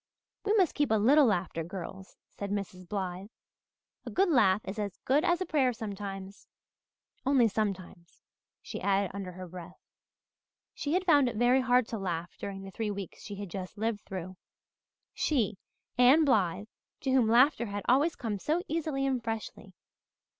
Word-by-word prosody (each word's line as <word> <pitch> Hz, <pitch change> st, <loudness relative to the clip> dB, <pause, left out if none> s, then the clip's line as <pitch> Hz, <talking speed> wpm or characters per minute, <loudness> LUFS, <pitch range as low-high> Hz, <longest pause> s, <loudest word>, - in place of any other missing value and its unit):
"We 420 Hz, 0 st, +1 dB
must 380 Hz, -7 st, +3 dB
keep 290 Hz, -1 st, +1 dB
a 220 Hz, -, +3 dB
little 265 Hz, +7 st, +5 dB
laughter, 175 Hz, -5 st, -1 dB
girls," 190 Hz, +2 st, -8 dB
said 200 Hz, -, -7 dB
Mrs. 190 Hz, -3 st, -5 dB
Blythe. 190 Hz, -1 st, -4 dB, 0.7 s
"A -, -, -6 dB
good 385 Hz, 0 st, +2 dB
laugh 210 Hz, -, +4 dB
is 200 Hz, +3 st, -5 dB
as 200 Hz, -2 st, -3 dB
good 285 Hz, +4 st, +3 dB
as 350 Hz, 0 st, +2 dB
a -, -, 0 dB
prayer 275 Hz, -7 st, +2 dB
sometimes 200 Hz, -3 st, -7 dB, 0.8 s
only 265 Hz, -3 st, +4 dB
sometimes," 195 Hz, -5 st, -4 dB, 0.4 s
she -, -, -6 dB
added 195 Hz, -1 st, +1 dB
under 195 Hz, -2 st, -6 dB
her 185 Hz, 0 st, -8 dB
breath. 180 Hz, 0 st, -10 dB, 0.9 s
She 290 Hz, +1 st, -3 dB
had 370 Hz, +1 st, +1 dB
found 290 Hz, -7 st, +5 dB
it 235 Hz, -, -7 dB
very 245 Hz, +4 st, +4 dB
hard 250 Hz, -2 st, +3 dB
to 225 Hz, -, -4 dB
laugh 175 Hz, -2 st, -4 dB
during 195 Hz, -1 st, -6 dB
the 195 Hz, -, -8 dB
three 220 Hz, +2 st, -3 dB
weeks 200 Hz, -3 st, -6 dB
she 205 Hz, -, -7 dB
had 200 Hz, -1 st, -6 dB
just 185 Hz, +2 st, -6 dB
lived 220 Hz, -1 st, -1 dB
through 185 Hz, -1 st, -7 dB, 0.8 s
she, 220 Hz, -10 st, 0 dB, 0.4 s
Anne 270 Hz, +6 st, +7 dB
Blythe, 205 Hz, -, +2 dB, 0.4 s
to 270 Hz, -, -1 dB
whom 255 Hz, -4 st, +4 dB
laughter 240 Hz, +1 st, +4 dB
had 205 Hz, 0 st, -4 dB
always 290 Hz, +6 st, +3 dB
come 215 Hz, -4 st, -3 dB
so 320 Hz, -, 0 dB
easily 305 Hz, -4 st, -1 dB
and 260 Hz, -3 st, 0 dB
freshly. 225 Hz, -1 st, -6 dB
215 Hz, 170 wpm, -30 LUFS, 195-265 Hz, 0.9 s, Anne